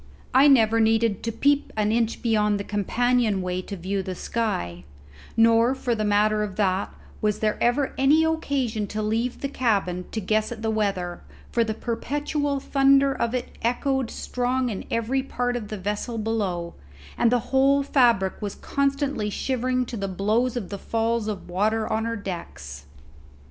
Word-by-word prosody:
I 270 Hz, +3 st, +7 dB
never 230 Hz, -5 st, +5 dB
needed 225 Hz, -2 st, +2 dB
to 230 Hz, -, -2 dB
peep 285 Hz, +5 st, +1 dB
an 210 Hz, 0 st, +2 dB
inch 230 Hz, 0 st, 0 dB
beyond 210 Hz, -3 st, +2 dB
the -, -, -3 dB
companion 215 Hz, 0 st, +1 dB
way 180 Hz, 0 st, -2 dB
to 200 Hz, +1 st, -7 dB
view 190 Hz, +3 st, -2 dB
the 185 Hz, -1 st, -5 dB
sky; 90 Hz, -, -3 dB, 0.5 s
nor 230 Hz, +3 st, +5 dB
for 245 Hz, -2 st, -1 dB
the 215 Hz, -2 st, -1 dB
matter 210 Hz, +1 st, +2 dB
of 205 Hz, -3 st, -3 dB
that 195 Hz, -2 st, 0 dB, 0.3 s
was 210 Hz, -1 st, +1 dB
there 215 Hz, -1 st, 0 dB
ever 260 Hz, +3 st, +1 dB
any 290 Hz, +4 st, +5 dB
occasion 275 Hz, -9 st, -1 dB
to 215 Hz, +2 st, -3 dB
leave 225 Hz, +3 st, -1 dB
the 275 Hz, -, -1 dB
cabin 200 Hz, -9 st, 0 dB
to 220 Hz, -, -2 dB
guess 215 Hz, +2 st, 0 dB
at 225 Hz, -2 st, -7 dB
the 220 Hz, -, +1 dB
weather, 195 Hz, -5 st, -1 dB, 0.3 s
for 235 Hz, -, +2 dB
the 220 Hz, -1 st, -3 dB
perpetual 290 Hz, +4 st, -2 dB
thunder 275 Hz, 0 st, +4 dB
of 235 Hz, -1 st, -1 dB
it 250 Hz, -, -4 dB
echoed 260 Hz, +1 st, 0 dB
strong 250 Hz, +1 st, -1 dB
in 195 Hz, -, -5 dB
every 230 Hz, +4 st, 0 dB
part 245 Hz, -2 st, -2 dB
of 230 Hz, -4 st, -4 dB
the 215 Hz, -, -5 dB
vessel 210 Hz, +4 st, -3 dB
below, 200 Hz, -6 st, -2 dB, 0.4 s
and 235 Hz, -, +3 dB
the 245 Hz, +1 st, -1 dB
whole 275 Hz, +1 st, +4 dB
fabric 235 Hz, -9 st, +2 dB
was 205 Hz, -2 st, -4 dB
constantly 275 Hz, -5 st, -1 dB
shivering 255 Hz, +2 st, -1 dB
to 235 Hz, -, -6 dB
the 195 Hz, -1 st, -2 dB
blows 215 Hz, +6 st, 0 dB
of 210 Hz, -6 st, -4 dB
the 200 Hz, -, -5 dB
falls 225 Hz, 0 st, -1 dB
of 210 Hz, -3 st, -5 dB
water 215 Hz, +5 st, 0 dB
on 220 Hz, +1 st, 0 dB
her 230 Hz, 0 st, -2 dB
decks. 170 Hz, -, -7 dB
225 Hz, 175 wpm, -24 LUFS, 205-250 Hz, 0.5 s, I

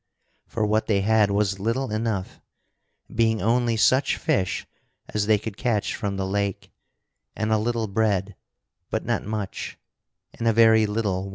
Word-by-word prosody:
For 110 Hz, -, -1 dB
what 110 Hz, +1 st, +1 dB
they 100 Hz, -3 st, +2 dB
had 105 Hz, 0 st, +3 dB
was 100 Hz, -1 st, 0 dB
little 115 Hz, +5 st, -1 dB
enough, 110 Hz, -3 st, -3 dB, 0.7 s
being 110 Hz, -1 st, +2 dB
only 115 Hz, +1 st, +1 dB
such 130 Hz, +5 st, +3 dB
fish 95 Hz, -2 st, 0 dB, 0.4 s
as 105 Hz, -1 st, -1 dB
they 110 Hz, -1 st, +5 dB
could 105 Hz, 0 st, -7 dB
catch 115 Hz, -4 st, 0 dB
from 100 Hz, -1 st, -3 dB
the 95 Hz, -, -1 dB
lake, 100 Hz, 0 st, -2 dB, 0.6 s
and 110 Hz, +1 st, -1 dB
a 110 Hz, -, +3 dB
little 115 Hz, +1 st, -1 dB
bread 100 Hz, -2 st, 0 dB, 0.5 s
but -, -, -2 dB
not -, -, -1 dB
much 105 Hz, -2 st, -5 dB, 0.6 s
and 115 Hz, -, -3 dB
a 115 Hz, -, +4 dB
very 110 Hz, -1 st, +5 dB
little 105 Hz, -3 st, -1 dB
wine. -, -, -7 dB
110 Hz, 160 wpm, -24 LUFS, 100-115 Hz, 0.7 s, they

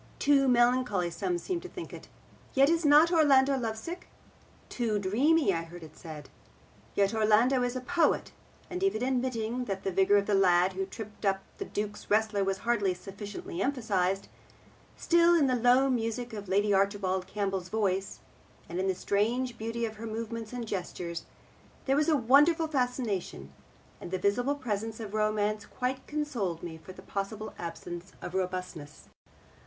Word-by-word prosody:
Too 280 Hz, -1 st, +4 dB
melancholy 240 Hz, -7 st, +2 dB
some 180 Hz, 0 st, -1 dB
seemed 345 Hz, -, -3 dB
to 365 Hz, -, -9 dB
think 355 Hz, -, -8 dB
it. -, -, -10 dB, 0.5 s
Yet 275 Hz, +3 st, +5 dB
is 335 Hz, 0 st, +1 dB
not 300 Hz, +3 st, +6 dB
Orlando 280 Hz, -4 st, +5 dB
lovesick? 245 Hz, +9 st, -4 dB, 0.6 s
Too 230 Hz, -4 st, -1 dB
dreamy, 245 Hz, +7 st, +3 dB
I 165 Hz, -, -1 dB
heard 170 Hz, +1 st, -10 dB
it 155 Hz, -1 st, -12 dB
said. 155 Hz, -3 st, -9 dB, 0.7 s
Yet 200 Hz, +1 st, +2 dB
Orlando 225 Hz, +4 st, +3 dB
is 245 Hz, 0 st, -1 dB
a 255 Hz, -, -3 dB
poet. 340 Hz, +6 st, +1 dB, 0.4 s
And 360 Hz, +1 st, -5 dB
even 385 Hz, -, +1 dB
admitting 250 Hz, -2 st, -1 dB
that 195 Hz, -3 st, -4 dB
the 195 Hz, -, -1 dB
vigour 195 Hz, +2 st, +4 dB
of 200 Hz, -, +1 dB
the 210 Hz, -, 0 dB
lad 185 Hz, -1 st, +4 dB
who 190 Hz, +1 st, -3 dB
tripped 215 Hz, +1 st, -9 dB
up 195 Hz, -1 st, +1 dB, 0.2 s
the -, -, -3 dB
Duke's 210 Hz, 0 st, -5 dB
wrestler 210 Hz, -1 st, +2 dB
was 195 Hz, 0 st, 0 dB
hardly 205 Hz, -6 st, +1 dB
sufficiently 195 Hz, 0 st, -7 dB
emphasised, 200 Hz, -7 st, 0 dB, 0.7 s
still 340 Hz, 0 st, +4 dB
in 315 Hz, -4 st, +4 dB
the 260 Hz, -, +2 dB
low 250 Hz, +2 st, +4 dB
music 240 Hz, -1 st, -2 dB
of 205 Hz, -2 st, -6 dB
Lady 205 Hz, +2 st, +2 dB
Archibald 195 Hz, -2 st, +1 dB
Campbell's 195 Hz, -3 st, -2 dB
voice, 195 Hz, -2 st, -1 dB, 0.5 s
and 175 Hz, +2 st, -4 dB
in 190 Hz, -, 0 dB
the 190 Hz, -, +1 dB
strange 230 Hz, +6 st, 0 dB
beauty 230 Hz, +1 st, -3 dB
of 220 Hz, -1 st, -6 dB
her 225 Hz, +1 st, -6 dB
movements 225 Hz, 0 st, -5 dB
and 245 Hz, -2 st, -4 dB
gestures, 175 Hz, -3 st, -4 dB, 0.6 s
there 270 Hz, -, +2 dB
was 300 Hz, +2 st, +2 dB
a 310 Hz, -, +4 dB
wonderful 295 Hz, +7 st, +4 dB
fascination, 245 Hz, -, -2 dB, 0.5 s
and -, -, -8 dB
the 185 Hz, -, -1 dB
visible 245 Hz, +9 st, +1 dB
presence 225 Hz, -4 st, -3 dB
of 215 Hz, -2 st, -7 dB
romance 215 Hz, -1 st, 0 dB
quite 260 Hz, +1 st, -3 dB
consoled 250 Hz, -, -2 dB
me 160 Hz, -2 st, -7 dB
for 175 Hz, -, -11 dB
the -, -, -13 dB
possible 210 Hz, +2 st, -4 dB
absence 175 Hz, +2 st, -7 dB
of 175 Hz, -, -7 dB
robustness. 180 Hz, -5 st, -4 dB
215 Hz, 165 wpm, -29 LUFS, 195-255 Hz, 0.7 s, not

